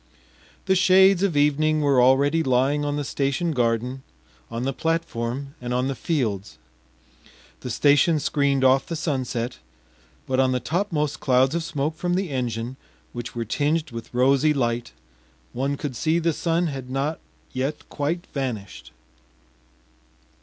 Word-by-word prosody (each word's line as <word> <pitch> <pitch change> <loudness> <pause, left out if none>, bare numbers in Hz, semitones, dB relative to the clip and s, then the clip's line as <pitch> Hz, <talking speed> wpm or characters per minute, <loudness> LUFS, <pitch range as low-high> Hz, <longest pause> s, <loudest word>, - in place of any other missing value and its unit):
The 190 - +3
shades 190 0 +5
of 190 -7 +1
evening 155 +1 +2
were 140 -3 +4
already 140 +5 +4
lying 135 +1 +2
on 145 0 -1
the 145 - -2
station 140 +5 -1
garden, 125 0 0 0.5
on 115 +1 -4
the 135 +1 -1
platform, 140 -4 -2
and 125 0 -2
on 125 +1 +1
the - - -1
fields; 110 - -2 1.0
the 125 - -6
station 145 +6 +4
screened 140 -2 +1
off 130 +1 +4
the 165 - -3
sunset, 130 -6 -2 0.7
but 130 0 0
on 130 -1 +3
the 125 - 0
topmost 160 -2 -1
clouds 130 +1 +3
of 170 -1 -1
smoke 155 -1 -2
from 175 +2 -1
the 185 -4 -2
engine, 125 -1 -3 0.4
which 120 0 -6
were 115 -1 -2
tinged 150 +7 0
with 115 -1 -8
rosy 135 +4 +3
light, 120 -2 -1 0.6
one 140 +3 -1
could 140 -3 -5
see 160 +6 +1
the 165 -1 +1
sun 170 +2 0
had 135 -5 -5
not 140 +4 -2 0.3
yet 135 +4 -3
quite 165 +5 -2
vanished. 120 -8 -5
140 Hz, 145 wpm, -24 LUFS, 125-155 Hz, 1.0 s, shades